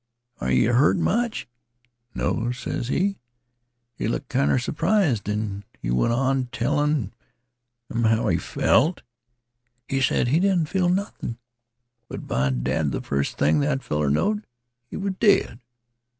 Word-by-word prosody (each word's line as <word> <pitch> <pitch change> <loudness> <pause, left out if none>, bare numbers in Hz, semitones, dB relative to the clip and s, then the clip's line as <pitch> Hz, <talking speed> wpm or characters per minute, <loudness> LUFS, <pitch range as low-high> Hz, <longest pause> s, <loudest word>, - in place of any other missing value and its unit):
Are 65 - -2
yeh 65 - +3
hurt 130 +5 +4
much? 235 +2 0 0.7
'No,' 120 +2 -1
ses 125 -1 -4
he. 195 +8 0 0.7
He 110 - -3
looked 120 +3 -3
kinder 135 +1 +2
surprised, 155 - +1
an' 105 -1 -3 0.2
he - - -3
went 60 - +2
on 130 +1 +1
tellin' 135 -1 0 0.8
'em 115 0 +1
how 110 +1 +2
he 85 - +2
felt. 160 - +1 0.8
He 135 0 -1
sed 130 -2 +2
he 155 +6 +3
didn't 180 -5 +2
feel 185 -2 +1
nothin'. 180 - -2 0.7
But, - - -7
by 65 +2 0
dad, 65 +4 0
th' - - -4
first 70 0 -1
thing 75 - +3
that 140 -2 0
feller 75 -1 0
knowed 210 - +1 0.5
he - - -6
was 195 -1 -2
dead. 200 - +3
125 Hz, 140 wpm, -24 LUFS, 100-165 Hz, 0.8 s, hurt